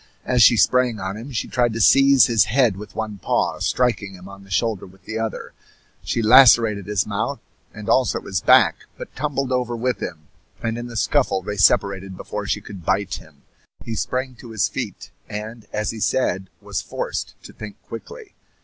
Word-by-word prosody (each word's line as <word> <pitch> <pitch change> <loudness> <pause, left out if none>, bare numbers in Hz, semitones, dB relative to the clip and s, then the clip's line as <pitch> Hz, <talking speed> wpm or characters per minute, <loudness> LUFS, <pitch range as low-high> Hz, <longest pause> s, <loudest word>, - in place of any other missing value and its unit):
As 125 -1 +2
she 120 - +7
sprang 120 +3 +3
on 95 +1 -4
him 115 +6 -8
she 115 - -3
tried 120 -2 +1
to 115 - -4
seize 135 +3 +6
his 115 -5 +3
head 120 -2 +2
with 100 -1 -10
one 110 -2 -4
paw, - - 0
striking 115 -6 0
him 90 +1 -12
on 100 0 -12
the 95 - -18
shoulder 100 +3 -1
with 95 +1 -20
the 110 0 -4
other. 110 -1 -4 0.5
She 115 - -2
lacerated 115 -4 +6
his 105 -2 0
mouth 100 -1 -3 0.3
and 110 0 -10
also 125 +1 +2
his 95 -4 -3
back, - - +4
but - - -10
tumbled 135 -2 -2
over 125 -1 -1
with 125 +2 -2
him, 75 -2 -6 0.4
and 115 0 -1
in 120 - -6
the 115 -2 -7
scuffle 110 -7 +1
they 105 +2 -4
separated 95 -1 +2
before - - -5
she - - -1
could 95 -4 -10
bite 95 +3 0
him. 75 -3 -20 0.4
He 115 - -4
sprang 130 +3 -2
to 120 - -11
his 105 -6 0
feet, - - -6 0.2
and, 110 +2 -7
as 105 0 -2
he 110 - -8
said, 95 -6 0
was 100 -4 -4
forced 80 - -5
to - - -12
think 105 -2 -10
quickly. 425 - -10
110 Hz, 195 wpm, -22 LUFS, 100-120 Hz, 0.5 s, she